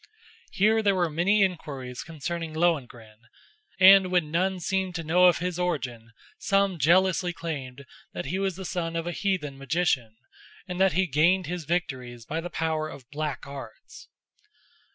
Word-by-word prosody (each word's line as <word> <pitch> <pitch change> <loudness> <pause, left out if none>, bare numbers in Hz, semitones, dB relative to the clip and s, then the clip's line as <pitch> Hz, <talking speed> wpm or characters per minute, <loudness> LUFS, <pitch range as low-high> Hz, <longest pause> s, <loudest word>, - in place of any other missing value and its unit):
Here 220 +3 +3
there 200 -2 +2
were 175 -3 0
many 195 +6 +3
inquiries 140 -9 -4
concerning 165 0 -5
Lohengrin, 125 -10 -1 0.6
and 190 0 +8
when 175 -4 +1
none 185 +3 0
seemed 190 +1 -2
to 165 - -3
know 175 +4 +4
of 180 - +5
his 180 0 -3
origin, 125 -10 -3 0.3
some 195 -3 +1
jealously 180 +4 +3
claimed 140 -5 -6 0.3
that - - -5
he 185 +7 -2
was 195 -2 -1
the 190 +1 -7
son 170 -2 -3
of 165 0 -2
a 175 - -2
heathen 170 -7 -2
magician, 135 -6 0 0.5
and 180 0 -3
that 190 -3 +4
he 185 +3 +2
gained 170 +5 +2
his 175 0 -5
victories 130 -8 -3
by 160 +6 -3
the 175 - -6
power 160 -2 -2
of 135 -4 -12
black 150 -1 -4
arts. 135 -5 -11
170 Hz, 160 wpm, -26 LUFS, 145-185 Hz, 0.6 s, and